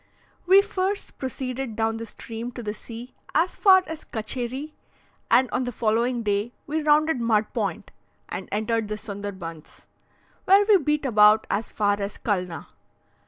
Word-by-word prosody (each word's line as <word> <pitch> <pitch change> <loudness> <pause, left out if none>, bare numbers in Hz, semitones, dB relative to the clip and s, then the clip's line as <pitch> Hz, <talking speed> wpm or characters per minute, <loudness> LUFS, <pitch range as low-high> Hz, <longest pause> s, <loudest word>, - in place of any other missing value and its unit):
We 390 +2 +7
first 395 -1 -3
proceeded 260 -2 -4
down 225 0 0
the 230 0 -6
stream 230 +2 -7
to 240 - -7
the 210 -1 -3
sea 235 +3 -10 0.2
as 335 +4 +2
far 375 -2 +6
as 320 -1 -7
Katcherie, 250 +6 -4 0.6
and 260 +1 +5
on 255 - 0
the 245 - -3
following 235 +2 0
day 205 +3 -1
we 310 +2 -1
rounded 300 -2 +3
Mud 220 -2 +1
Point, - - -3 0.4
and - - -6
entered 220 +1 0
the 210 0 -4
Sonderbunds, 195 -6 -8 0.6
where 395 +2 +6
we 420 -2 +7
beat 300 -2 0
about 215 -2 +5
as 210 +2 -2
far 205 -1 +1
as 200 +1 -4
Culna. 180 -5 -2
235 Hz, 155 wpm, -25 LUFS, 210-295 Hz, 0.6 s, We